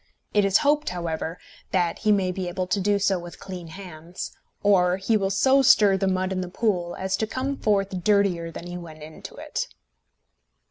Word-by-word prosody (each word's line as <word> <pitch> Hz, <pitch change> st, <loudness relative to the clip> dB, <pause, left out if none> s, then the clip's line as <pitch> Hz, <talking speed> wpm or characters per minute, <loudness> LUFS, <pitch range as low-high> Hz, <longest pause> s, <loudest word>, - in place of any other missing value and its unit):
It 205 Hz, -, +4 dB
is 195 Hz, -1 st, +5 dB
hoped, 295 Hz, +1 st, +3 dB
however, 170 Hz, -1 st, -4 dB, 0.3 s
that 175 Hz, -3 st, 0 dB
he 215 Hz, -, +2 dB
may 190 Hz, -3 st, +2 dB
be 185 Hz, 0 st, -4 dB
able 180 Hz, +1 st, -2 dB
to 190 Hz, +2 st, 0 dB
do 205 Hz, +1 st, +2 dB
so 195 Hz, -2 st, +1 dB
with 175 Hz, -1 st, -10 dB
clean 180 Hz, -3 st, -8 dB
hands, 175 Hz, 0 st, -8 dB, 0.3 s
or 185 Hz, -3 st, +4 dB
he 195 Hz, +4 st, +1 dB
will 195 Hz, -2 st, +1 dB
so 265 Hz, +8 st, +4 dB
stir 210 Hz, -6 st, +6 dB
the 195 Hz, 0 st, 0 dB
mud 185 Hz, 0 st, 0 dB
in 185 Hz, -1 st, -1 dB
the 180 Hz, -, -5 dB
pool 180 Hz, -4 st, -1 dB
as 190 Hz, 0 st, -1 dB
to 220 Hz, -, -1 dB
come 265 Hz, +5 st, -2 dB
forth 195 Hz, -6 st, 0 dB
dirtier 200 Hz, -5 st, +2 dB
than 165 Hz, -, -8 dB
he 175 Hz, 0 st, -6 dB
went 155 Hz, -3 st, -11 dB
into 155 Hz, +1 st, -10 dB
it. -, -, -4 dB
190 Hz, 195 wpm, -25 LUFS, 175-205 Hz, 0.3 s, stir